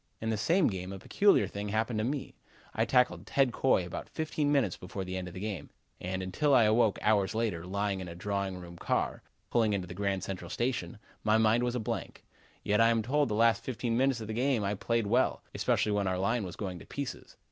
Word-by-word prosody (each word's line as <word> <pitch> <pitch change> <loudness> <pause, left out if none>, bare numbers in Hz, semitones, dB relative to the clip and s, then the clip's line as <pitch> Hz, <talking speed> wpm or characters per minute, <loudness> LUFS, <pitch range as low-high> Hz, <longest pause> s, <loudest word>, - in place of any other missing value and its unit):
In 110 0 -2
the - - +1
same 165 - +2
game, 95 -3 -2
a 100 - -6
peculiar 200 - +3
thing 100 0 -5
happened 110 +1 0
to - - 0
me. 135 +4 -3 0.4
I 115 - +1
tackled 125 +2 +2
Ted 135 -4 +2
Coy 130 -9 +2
about 90 - -6
fifteen 155 -2 -1
minutes 130 - +2
before 95 +1 -6
the 95 0 -5
end 90 -1 -4
of 90 - -9
the - - -5
game, 100 -6 -4 0.3
and 95 +1 -3
until 135 +10 +2
I 120 - +6
awoke 110 0 +3
hours 105 -1 +2
later, 100 -7 -1
lying 100 0 -1
in 95 - -6
a 85 - -7
drawing 100 0 -2
room 85 -1 -10
car, - - -1 0.3
pulling 110 -3 +3
into 95 -2 -1
the 85 - -8
Grand 100 0 -1
Central 95 -3 -5
Station, 120 -8 -2 0.3
my 110 0 +4
mind 110 +1 +4
was 125 0 -1
a - - 0
blank. 110 - -4 0.4
Yet 105 +2 +2
I 115 - +6
am 115 -1 +2
told 145 +4 +1
the 105 - -1
last 115 +1 +3
fifteen 120 -2 -2
minutes 130 0 +2
of 110 - -5
the 110 - -4
game 125 -1 +1
I 100 +1 0
played 115 +2 0
well, 120 +5 +1
especially 105 - +1
when 100 -1 +1
our 95 0 0
line 100 +3 0
was 90 -2 -7
going 95 -4 -5
to - - -12
pieces. 140 -2 -6
110 Hz, 235 wpm, -30 LUFS, 95-120 Hz, 0.4 s, I